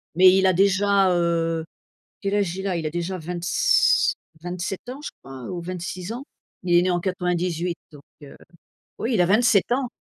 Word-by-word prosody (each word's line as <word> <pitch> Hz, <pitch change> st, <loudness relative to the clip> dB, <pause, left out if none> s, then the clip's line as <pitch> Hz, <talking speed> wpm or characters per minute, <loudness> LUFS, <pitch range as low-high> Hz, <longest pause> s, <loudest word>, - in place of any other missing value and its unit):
mais 185 Hz, +1 st, +7 dB
il 190 Hz, 0 st, +3 dB
a 185 Hz, -, +4 dB
déjà, 195 Hz, +1 st, +3 dB
heu 165 Hz, -1 st, 0 dB, 0.6 s
quel 200 Hz, 0 st, -2 dB
âge 195 Hz, -4 st, 0 dB
il 190 Hz, +1 st, -4 dB
a? 185 Hz, -, -1 dB
il 160 Hz, -2 st, -3 dB
a -, -, -2 dB
déjà 175 Hz, +3 st, -3 dB
vingt-s -, -, +2 dB, 0.3 s
27 180 Hz, +4 st, -5 dB
ans, 265 Hz, +3 st, -8 dB
je -, -, -5 dB
crois 135 Hz, -2 st, -10 dB
ou 180 Hz, -2 st, -4 dB
26 180 Hz, +2 st, -5 dB
ans. 245 Hz, +3 st, -6 dB, 0.4 s
Il 180 Hz, -, -4 dB
il 175 Hz, -, +7 dB
est -, -, +4 dB
né 185 Hz, -, +1 dB
en 175 Hz, -1 st, 0 dB
98 180 Hz, -1 st, -1 dB
donc 145 Hz, -2 st, -14 dB, 0.2 s
heu. 140 Hz, -, -12 dB, 0.6 s
Oui, 235 Hz, +2 st, -1 dB
il 185 Hz, -, +4 dB
a 205 Hz, +2 st, +3 dB
ans, 255 Hz, 0 st, 0 dB
180 Hz, 190 wpm, -23 LUFS, 170-200 Hz, 0.6 s, mais